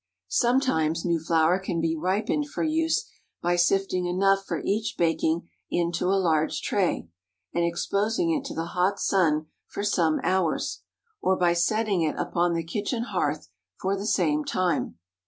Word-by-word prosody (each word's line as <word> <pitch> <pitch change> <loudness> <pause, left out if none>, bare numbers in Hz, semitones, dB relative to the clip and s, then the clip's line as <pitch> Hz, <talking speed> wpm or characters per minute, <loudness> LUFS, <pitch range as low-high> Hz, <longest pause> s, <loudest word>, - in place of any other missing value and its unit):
Sometimes 175 - +1
new 170 -1 +1
flour 165 +2 +2
can 185 -3 -3
be 165 0 0
ripened 200 - -1
for - - -3
use 320 +1 +1 0.3
by 175 +1 +1
sifting 180 0 +1
enough 195 +2 +2
for - - -2
each 215 +2 -1
baking 165 0 +1 0.2
into 170 0 0
a 195 +1 +3
large 160 -4 +1
tray, 185 - 0 0.5
and 170 - +1
exposing 205 - 0
it 300 -4 0
to - - -6
the 165 - -2
hot 185 +3 +1
sun 160 -5 +2 0.2
for 200 - -5
some 170 -6 +2
hours, 185 -4 0 0.4
or 190 - +2
by 175 -1 +3
setting 200 +2 +1
it 155 -2 0
upon 175 0 0
the 165 - -1
kitchen 215 +7 -2
hearth 155 - -2 0.3
for 190 +1 0
the 200 +2 -4
same 160 -8 +2
time. 180 - -1
180 Hz, 155 wpm, -26 LUFS, 165-200 Hz, 0.5 s, a